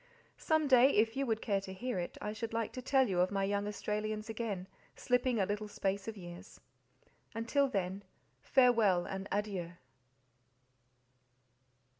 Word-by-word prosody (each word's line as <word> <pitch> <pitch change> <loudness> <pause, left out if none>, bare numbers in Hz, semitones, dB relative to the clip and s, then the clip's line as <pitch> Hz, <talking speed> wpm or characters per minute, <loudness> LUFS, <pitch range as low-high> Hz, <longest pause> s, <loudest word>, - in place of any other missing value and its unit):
Some 315 -2 +2
day, 260 0 +7
if 225 +2 +3
you 275 0 -1
would 225 -1 -1
care 200 -3 +1
to 195 - -8
hear 240 +1 -3
it, 175 - -5
I 210 - -4
should 225 +1 -5
like 230 -1 -2
to 255 - -5
tell 265 0 +3
you 185 -3 0
of 180 +1 +3
my 195 -1 -1
young 200 +1 0
Australians 215 +1 -3
again, 210 -5 -4 0.3
slipping 250 -1 +1
a 195 - +3
little 210 +2 -3
space 200 0 -2
of 220 -1 -5
years. 175 -2 -10 0.8
Until 255 +5 +2
then, 195 -4 -2 0.4
farewell 225 -9 +4
and 195 0 -5
adieu. 195 -4 -2
210 Hz, 155 wpm, -33 LUFS, 195-240 Hz, 0.8 s, day